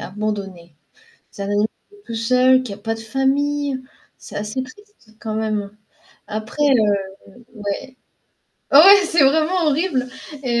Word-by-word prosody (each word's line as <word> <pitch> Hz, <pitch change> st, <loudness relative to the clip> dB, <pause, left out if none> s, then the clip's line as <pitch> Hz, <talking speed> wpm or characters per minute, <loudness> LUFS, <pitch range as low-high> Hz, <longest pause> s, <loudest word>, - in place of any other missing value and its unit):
abandonné. 195 Hz, -4 st, -5 dB, 0.6 s
C'est 200 Hz, -, -7 dB
un -, -, -3 dB
animal 205 Hz, +1 st, +1 dB, 0.2 s
qui 410 Hz, -, -20 dB
est 405 Hz, -, -21 dB
tout 230 Hz, -, -6 dB
seul, 255 Hz, +3 st, +3 dB
qui 225 Hz, -6 st, -6 dB
a -, -, -10 dB
pas 225 Hz, +2 st, -3 dB
de -, -, -10 dB
famille. 275 Hz, +4 st, -1 dB, 0.4 s
C'est -, -, -12 dB
assez 210 Hz, +5 st, -3 dB
triste 260 Hz, -, -18 dB
quand 220 Hz, -1 st, -5 dB
même. 215 Hz, -2 st, -2 dB, 0.6 s
Après, 215 Hz, +7 st, -4 dB
heu 215 Hz, -8 st, +3 dB, 0.5 s
ouais. 210 Hz, +5 st, -5 dB, 0.8 s
Ouais, 385 Hz, +8 st, +8 dB
c'est 330 Hz, -3 st, +3 dB
vraiment 320 Hz, +5 st, +2 dB
horrible, 290 Hz, -4 st, 0 dB, 0.4 s
et 240 Hz, -1 st, +1 dB
245 Hz, 145 wpm, -20 LUFS, 215-290 Hz, 0.8 s, Ouais